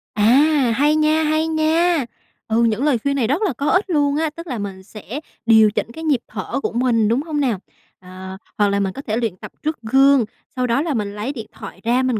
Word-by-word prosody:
À, 205 - +1 0.5
hay 295 +4 +3
nha, 310 +1 +2
hay 310 +1 +1
nha! 320 -1 +2 0.4
Ừ, 230 +1 +2
những 230 +2 +1
lời 290 -4 +3
khuyên 280 0 0
này 250 -5 +1
rất 290 - 0
là 395 -9 +1
có 280 +5 -2
ích 380 +2 +2
luôn 290 -3 +1
á, 320 0 0
tức 335 +3 -10
là 255 -5 -3
mình 195 -2 -6
sẽ 215 +6 -8 0.3
điều 220 -2 +6
chỉnh 230 - -3
cái 320 +7 -9
nhịp 295 -6 +2
thở 215 +4 -4
của - - -1
mình, 235 -2 +2
đúng 235 +5 +1
hông 305 -1 -3
nào? 245 -9 0 0.4
Ờ, 185 +1 -9 0.2
hoặc 205 - +3
là 200 0 0
mình 195 -1 -1
có 275 - -7
thể 215 0 0
luyện 230 -6 -1
tập - - -10
trước 310 +1 -1
gương, 270 +2 +4 0.3
sau 255 -1 0
đó 235 +4 +1
là 320 -1 -1
mình 205 -4 -3
lấy 220 +7 -3
điện 225 -5 -7
thoại - - -11
ra, 245 +3 +2
mình 255 -4 0
255 Hz, 240 wpm, -20 LUFS, 220-305 Hz, 0.5 s, điều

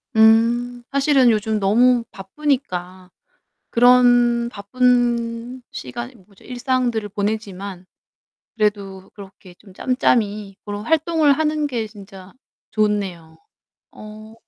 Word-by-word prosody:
음. 235 +2 +3
사실은 275 -3 +3
요즘 215 0 -1
너무 235 +5 +3
바쁘니까 190 -5 -4 0.6
그런 245 -1 +4
바쁜 240 +2 -1
시간 240 +1 -7
이 - - -23
뭐죠? 200 -2 -22
일상들을 250 -3 -2
보내지만 200 -3 -4 0.7
그래도 200 -3 -2
그렇게 195 -2 -14
좀 195 -3 -17
짬짬이 210 -5 0
그런 205 +1 -6
활동을 320 -2 +2
하는 305 0 0
게 230 -5 -3
진짜 195 -3 -14 0.4
좋네요. 200 -6 -2 0.5
어. 215 +1 -12
220 Hz, 220 characters per minute, -20 LUFS, 200-245 Hz, 0.7 s, 그런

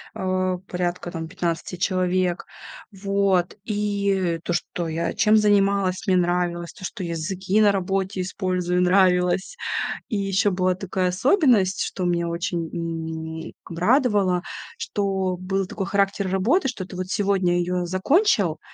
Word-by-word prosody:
э, 185 -1 0
порядка 175 -1 -3
там 165 -1 -5
15 170 0 -3
человек. 180 -1 0 0.5
Вот, 195 -2 +1
и 200 -5 0
то, 175 - -2
что 175 0 -2
я 165 +1 -2
чем 215 0 +4
занималась, 200 -3 +2
мне 185 -1 +4
нравилось, 175 -1 0
то, - - -14
что 190 - -5
языки 185 +5 -1
на 205 - +6
работе 190 0 -1
использую 180 -1 -1
нравилось. 180 - +3 0.5
И - - -3
ещё 195 0 +1
была 185 0 +1
такая 185 -1 -1
особенность, 210 - +3
что 185 - -3
меня 170 -1 +1
очень, 170 -1 -2
м, 160 -1 -5 0.2
б 165 - -6
радовало, 205 -4 +3 0.4
что 195 - -1
был 190 +2 -1
такой 195 +1 -4
характер 200 0 0
работы, 225 - +2
что 220 -7 -4
ты 185 - -10
вот 185 0 -4
сегодня 190 -3 +1
её 180 0 -1
закончил, 190 - +2
185 Hz, 140 wpm, -23 LUFS, 175-200 Hz, 0.5 s, на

